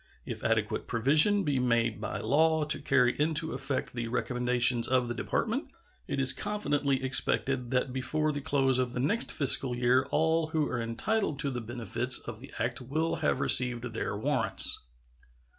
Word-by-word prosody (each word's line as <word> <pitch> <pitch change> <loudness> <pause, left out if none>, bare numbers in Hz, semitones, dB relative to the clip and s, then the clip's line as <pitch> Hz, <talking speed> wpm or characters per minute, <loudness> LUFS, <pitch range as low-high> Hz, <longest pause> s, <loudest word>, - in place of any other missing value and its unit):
If - - -7
adequate - - -1
provision 155 - +3
be 145 -5 -1
made 120 -2 0
by - - -5
law 160 +6 +1
to 150 -1 +1
carry 125 -3 +2
into 160 +1 +2
effect 135 +1 -4
the 115 -1 -4
recommendations 125 0 +1
of 130 -1 +1
the 120 - -3
Department, - - -3 0.4
it - - -3
is 135 -1 +4
confidently 145 -10 -2
expected 130 -1 +1
that 125 0 -1
before 150 +4 -1
the 145 -1 -5
close 135 -2 +1
of 125 -1 -2
the 125 - -4
next 210 - 0
fiscal 135 -3 +4
year 125 +1 +1
all 160 +1 0
who 155 -2 -1
are 120 -2 -3
entitled 150 - -2
to 140 -2 -2
the 125 -1 -5
benefits 120 +2 0
of 115 -2 -9
the 135 +3 -13
act 120 +2 -3
will 155 +6 -2
have 150 -4 -1
received 125 -2 +4
their 105 -2 -4
warrants. 130 0 0
130 Hz, 170 wpm, -28 LUFS, 125-150 Hz, 0.4 s, is